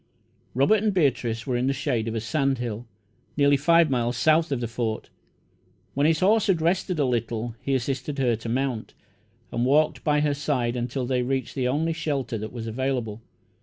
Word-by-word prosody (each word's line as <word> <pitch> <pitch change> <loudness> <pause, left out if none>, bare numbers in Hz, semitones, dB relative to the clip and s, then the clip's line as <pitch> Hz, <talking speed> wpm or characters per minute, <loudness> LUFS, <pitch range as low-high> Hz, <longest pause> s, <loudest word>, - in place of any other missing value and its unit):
Robert 145 +12 +4
and 210 -2 0
Beatrice 120 -8 +1
were 130 - -1
in 125 +2 0
the 135 - +2
shade 115 -4 -1
of 115 - -3
a - - 0
sand 135 +5 0
hill, 120 -1 -5 0.5
nearly 140 -1 +5
five 165 +2 +4
miles 120 -1 0
south 160 +5 +3
of 135 - 0
the 120 - -2
Fort. 115 -1 -3 0.8
When 140 +2 +2
his 160 -1 +2
horse 210 +3 +3
had 190 -4 +3
rested 175 +2 0
a 145 - +2
little, 120 -2 -2
he 135 - 0
assisted 135 +3 -2
her 125 -4 +2
to 115 +1 -7
mount, 125 -2 -2 0.6
and 120 - -1
walked 150 +4 +2
by 150 -1 +2
her 150 -1 +2
side 135 -4 -1
until 125 +1 -2
they 125 0 0
reached 130 0 -2
the 130 -2 -1
only 155 +5 0
shelter 140 -8 -2
that 110 +1 -6
was 115 -2 -6
available. 115 -2 -2
130 Hz, 195 wpm, -25 LUFS, 120-150 Hz, 0.8 s, nearly